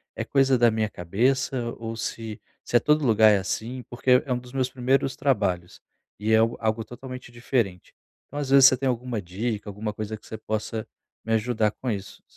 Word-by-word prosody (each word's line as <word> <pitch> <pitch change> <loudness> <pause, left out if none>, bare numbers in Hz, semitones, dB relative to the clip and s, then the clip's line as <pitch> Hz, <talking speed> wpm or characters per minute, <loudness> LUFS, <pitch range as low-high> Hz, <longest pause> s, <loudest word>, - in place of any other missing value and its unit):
é - - -2
coisa 135 -1 +3
da 120 -1 +5
minha 110 -1 0
cabeça, 120 +6 0
ou 115 0 -5
se 110 -1 -5 0.2
se - - -4
é - - +4
todo 150 +4 +2
lugar 110 -2 +6
é 105 - +4
assim, 115 +6 -4
porque 125 +1 +3
é 135 - -5
um - - 0
dos 125 +1 -14
meus 130 -1 0
primeiros 130 +1 +1
trabalhos 95 -10 0 0.4
e 105 +2 -1
é 110 - +6
algo 115 +1 +2
algo 110 0 0
totalmente 125 +2 -9
diferente. 120 -7 -2 0.3
Então, 145 - -6
às 140 -2 -3
vezes, 135 -1 +8
você 130 - 0
tem 135 +2 -1
alguma 120 -2 -2
dica, 105 +4 -4
alguma 105 +1 -4
coisa 110 +1 -4
que - - -22
você 110 - -7
possa 110 0 -3 0.4
me 115 - 0
ajudar 110 -1 +1
com 125 +3 -4
isso. 100 -2 -6
115 Hz, 205 wpm, -25 LUFS, 110-130 Hz, 0.4 s, vezes